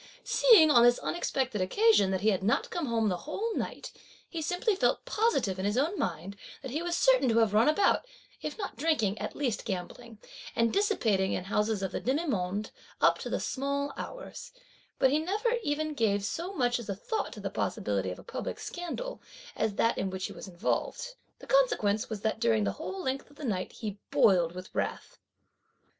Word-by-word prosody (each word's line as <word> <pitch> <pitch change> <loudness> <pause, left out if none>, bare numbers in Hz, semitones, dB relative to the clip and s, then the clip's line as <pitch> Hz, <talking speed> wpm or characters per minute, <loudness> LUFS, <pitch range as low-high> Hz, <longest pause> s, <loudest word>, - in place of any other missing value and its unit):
Seeing, 410 -11 +6
on 240 - +7
this 240 0 +6
unexpected 260 - -2
occasion, 405 - +4
that 190 -1 -1
he 215 - +3
had 190 - -1
not 205 +4 +1
come 340 -5 -2
home 225 -2 +1
the 180 -3 0
whole 425 - -3
night, - - -4 0.4
he 330 - -5
simply 360 +7 0
felt 385 - +1
positive, 420 - +1
in 190 - -2
his 205 +3 0
own 310 +9 +1
mind, 180 +3 -3 0.3
that 265 - -5
he 305 +5 -2
was 345 0 -1
certain 260 -1 +4
to 225 - +2
have 225 -3 +3
run 220 +6 +5
about, 400 +9 +2 0.3
if - - -5
not 400 - -5
drinking, 235 -8 +1
at - - -5
least 255 -7 -1
gambling, 215 +4 -6 0.4
and 230 0 +2
dissipating 225 - +2
in - - -2
houses 210 0 0
of 190 - -2
the - - -2
demi 280 +7 0
monde 205 - -2 0.3
up - - +4
to - - -5
the - - -1
small 280 +1 -2
hours; - - -8 0.5
but 260 - +4
he 295 - +3
never 425 +9 0
even 305 -2 -1
gave 205 -6 +1
so 340 - -3
much 245 -9 +1
as 230 - -8
a 200 - -1
thought 430 - -3
to - - -9
the - - -4
possibility - - -1
of - - -5
a - - -12
public - - -5
scandal, 355 +9 -5 0.3
as 215 -2 -1
that 230 - +2
in 195 - -1
which 190 0 -4
he - - -6
was - - -9
involved. 190 - -2 0.2
The - - -13
consequence 220 - +2
was 215 -3 -5
that 220 0 -1
during 110 -2 +2
the 100 - +1
whole 190 +1 -5
length 265 +2 -3
of 290 - -19
the 295 - -7
night 185 -6 -2
he 205 -3 -6
boiled 175 -4 +4
with 185 0 -9
wrath. - - -3
240 Hz, 205 wpm, -29 LUFS, 200-325 Hz, 0.5 s, on